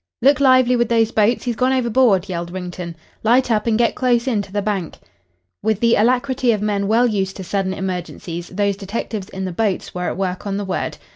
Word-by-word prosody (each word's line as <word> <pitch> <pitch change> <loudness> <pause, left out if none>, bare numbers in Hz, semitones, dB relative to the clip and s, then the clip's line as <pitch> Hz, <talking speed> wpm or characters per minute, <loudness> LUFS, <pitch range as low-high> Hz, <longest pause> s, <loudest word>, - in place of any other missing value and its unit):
"Look 280 +1 +5
lively 255 -2 +5
with 240 -1 +1
those 225 -1 +2
boats. 220 +3 +2
He's 240 -2 -2
gone 255 +4 +1
overboard," 235 -6 +2
yelled 170 -2 -4
Wrington. 180 -1 -6 0.3
"Light 240 +3 +3
up 215 0 +1
and 220 -1 +2
get 235 0 +2
close 245 -1 +1
in 225 -5 +1
to 195 - -11
the 205 - -1
bank." 195 -5 -3 0.6
With 220 -2 0
the 235 0 +3
alacrity 250 +2 +2
of 215 - -1
men 200 -2 0
well 230 +4 +4
used 195 -5 -1
to 190 - -6
sudden 195 +1 -1
emergencies 180 -2 -5
those 200 +1 0
detectives 200 0 -5
in 190 0 -5
the 185 - -3
boats 200 +1 -2
were 180 0 -3
at - - -5
work 185 +1 -3
on 195 0 -2
the 205 - -3
word. 190 - -3
210 Hz, 215 wpm, -20 LUFS, 190-240 Hz, 0.6 s, Look